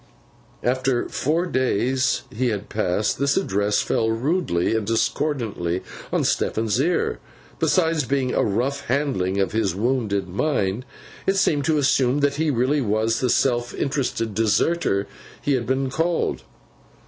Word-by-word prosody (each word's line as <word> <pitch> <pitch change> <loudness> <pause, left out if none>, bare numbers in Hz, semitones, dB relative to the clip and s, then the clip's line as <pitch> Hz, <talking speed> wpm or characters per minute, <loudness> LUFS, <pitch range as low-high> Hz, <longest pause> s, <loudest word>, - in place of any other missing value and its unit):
After 130 0 +1
the - - -10
four 160 +5 +1
days 130 - +1
he 125 +4 0
had 105 -3 -3
passed, 105 0 0
this 140 +1 +2
address 100 +2 +1
fell 115 - +1
rudely 115 - 0
and 110 -3 -1
discordantly 115 - -1 0.3
on - - +1
Stephen's 110 0 0
ear. 170 +6 0 0.4
Besides 165 -5 +2
being 130 0 0
a - - +2
rough 130 +7 -1
handling 120 -9 0
of 95 - +1
his 100 -5 0
wounded 105 -3 0
mind, 100 - -1 0.4
it 195 - +3
seemed 145 -7 +2
to 160 -1 +2
assume 135 -1 +2
that 140 0 +1
he 160 0 +1
really 135 +3 +1
was 110 0 +1
the 125 - 0
self 120 -1 +1
interested 130 -6 -1
deserter 110 - +1 0.3
he 145 - 0
had 120 -3 -1
been 130 0 0
called. 165 +4 -1
125 Hz, 145 wpm, -23 LUFS, 110-140 Hz, 0.4 s, it